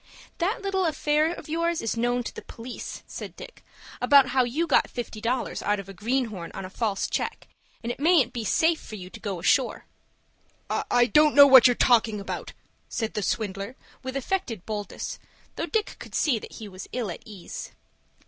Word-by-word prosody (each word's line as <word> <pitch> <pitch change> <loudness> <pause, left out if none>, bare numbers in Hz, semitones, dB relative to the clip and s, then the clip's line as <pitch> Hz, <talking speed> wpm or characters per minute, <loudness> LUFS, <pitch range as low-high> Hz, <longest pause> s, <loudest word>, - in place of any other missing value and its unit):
"That 390 +5 0
little 385 -2 +1
affair 305 +1 +2
of 345 - -8
yours 335 +1 0
is 225 - -2
known 245 +1 +1
to - - -6
the - - -8
police," 235 +2 -8
said - - -8
Dick; - - -11 0.4
"about 280 -3 +6
how 260 -1 +3
you 270 +8 0
got 305 - +3
fifty 230 -3 -6
dollars 245 +3 -1
out 205 0 +1
of 195 - -8
a 195 - -9
greenhorn 215 -4 -2
on 195 - -5
a 185 - -9
false 210 -3 -1
check, - - -3 0.4
and 235 - -2
it - - -7
mayn't 290 -6 +4
be 235 -3 -3
safe 320 - +2
for 215 - -9
you 185 -2 -9
to - - -10
go 200 -3 -3
ashore." 245 +8 +2 0.9
"I 245 0 +3
don't 300 +4 +4
know 285 0 +11
what 265 -2 +9
you're 245 - +3
talking 225 -4 +3
about," 200 - -5 0.4
said 225 -1 -2
the 210 - -1
swindler 200 +2 -2 0.3
with 260 +1 -4
affected 275 - -2
boldness, 210 -2 -5 0.4
though - - -3
Dick 440 -2 -1
could - - -9
see 255 -8 +2
that - - -11
he 220 - -8
was 185 -1 -9
ill 235 -7 -2
at - - -8
ease. 205 -5 -8
245 Hz, 195 wpm, -26 LUFS, 210-295 Hz, 0.9 s, know